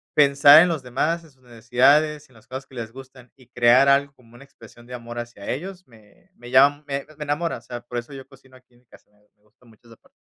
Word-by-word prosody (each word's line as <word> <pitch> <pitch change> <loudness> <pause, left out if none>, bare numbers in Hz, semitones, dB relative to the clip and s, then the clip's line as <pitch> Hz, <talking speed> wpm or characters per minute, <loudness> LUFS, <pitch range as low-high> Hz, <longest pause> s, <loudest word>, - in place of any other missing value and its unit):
pensar 145 +1 +7
en - - +1
los 155 -6 -4
demás, 155 +7 -2
en 160 - -19
sus 130 -1 -32
necesidades, 135 +6 +1
en 125 - -25
las 110 - -21
cosas 130 +2 -8
que 130 - -18
les 115 -1 -7
gustan. 130 -2 -15
Y, 130 -3 -21
crear 125 +3 +4
algo, 140 +1 +2
como 120 -2 -23
una 135 - -15
expresión 120 -3 -18
de 125 - -11
amor 120 0 -10
hacia 120 -4 -9
ellos, 185 +6 -7
me 110 -4 -23
me 120 +1 -13
llama 140 +3 +4
me 140 0 -4
me 150 - -6
enamora. 150 +2 -2
O - - -15
sea, 120 0 -9
por 120 0 -8
eso 120 +4 -12
yo 135 -1 -11
cocino 130 -1 -20
aquí 125 -1 -29
en - - -26
mi - - -38
casa, - - -21
me 105 - -33 0.2
me 105 - -40
gusta 105 +4 -30
mucho 115 +1 -23
esa 115 - -16
parte. - - -29
130 Hz, 265 wpm, -22 LUFS, 120-140 Hz, 0.2 s, pensar